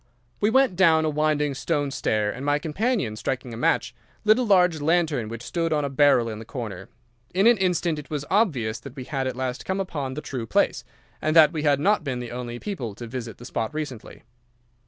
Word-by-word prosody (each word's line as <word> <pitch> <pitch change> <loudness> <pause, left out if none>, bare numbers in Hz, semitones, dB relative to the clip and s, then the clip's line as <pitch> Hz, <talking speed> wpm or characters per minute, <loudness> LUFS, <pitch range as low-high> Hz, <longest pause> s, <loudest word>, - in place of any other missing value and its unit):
"We 210 - +3
went 265 -4 +3
down 165 -3 +4
a 155 - +1
winding 150 -1 +1
stone 145 0 -1
stair, 105 -6 0
and 125 +5 -7
my 145 +1 +2
companion, 165 - -1
striking 125 +3 -4
a - - -6
match, 120 - +1 0.3
lit 215 +3 +5
a - - +2
large 180 -8 +3
lantern 155 -7 +1
which 115 +1 -7
stood 165 +4 -2
on 150 -2 +1
a 140 - -3
barrel 140 -4 +4
in 110 -2 -5
the - - -7
corner. 110 -6 -7 0.5
In 195 +3 +3
an 235 -3 +6
instant 175 -4 +1
it 150 - -11
was 150 -2 -3
obvious 130 - +1
that 135 +2 -11
we 130 - -6
had 135 0 -2
at 130 - -3
last 130 0 -3
come 190 +1 -2
upon 145 -9 -3
the 150 - -4
true 125 -6 -5
place, 105 - +1 0.4
and 155 +1 0
that 160 0 +7
we 155 - -2
had 145 -2 +3
not 200 +3 +2
been 130 -4 -3
the 120 -1 -6
only 120 -1 -5
people 125 - -5
to 120 - -8
visit 115 -1 -6
the 120 - -11
spot 115 +4 -3
recently. 145 -7 -6
145 Hz, 220 wpm, -25 LUFS, 125-170 Hz, 0.5 s, that